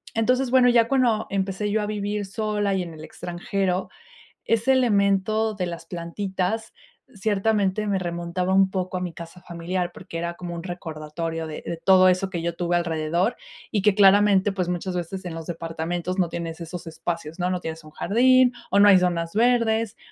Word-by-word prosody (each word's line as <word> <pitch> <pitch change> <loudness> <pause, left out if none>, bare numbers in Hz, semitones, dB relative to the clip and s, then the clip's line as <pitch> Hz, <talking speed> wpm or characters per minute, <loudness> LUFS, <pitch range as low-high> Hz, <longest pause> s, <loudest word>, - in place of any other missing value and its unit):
entonces 250 +3 +2
bueno, 250 -1 +5
ya 230 -1 +4
cuando 240 -5 +2
empecé 195 +1 -2
yo 210 0 0
a - - -1
vivir 205 -1 -2
sola 210 -1 -1
y 190 - 0
en 170 -2 -7
el 155 - -10
extranjero, 180 +3 -3 0.6
ese 230 +3 +2
elemento 215 -2 +2
de 185 -3 -2
las 170 -1 -6
plantitas, 190 +5 -3 0.4
ciertamente 210 0 0
me 195 -2 +1
remontaba 175 +1 -2
un 190 0 +4
poco 185 -1 -3
a 180 - -2
mi 175 -2 -4
casa 170 +2 -10
familiar 175 +1 -3
porque 165 - -8
era 170 0 -3
como 175 -1 -6
un 170 - -6
recordatorio 165 -2 -5
de 155 - -7
de 170 - -3
todo 185 +2 +5
eso 185 +1 +2
que 175 -3 -4
yo 170 0 -2
tuve 175 0 0
alrededor 170 +6 0 0.3
y 205 - 0
que 210 0 +4
claramente, 200 0 +5
pues 180 -2 -2
muchas 180 +1 -3
veces 180 +2 -4
en 165 -2 -5
los 165 -1 -7
departamentos 170 +2 -4
no 180 -3 +1
tienes 170 0 -5
esos 170 0 -7
espacios, 165 0 -5
¿no?, 180 0 0
no 180 -1 -1
tienes 160 -1 -6
un 155 - -14
jardín 250 +7 +4 0.2
o 200 - +4
no 205 - +7
hay 190 -2 +8
zonas 170 -2 -1
verdes. 230 -2 +2
185 Hz, 190 wpm, -24 LUFS, 170-210 Hz, 0.6 s, hay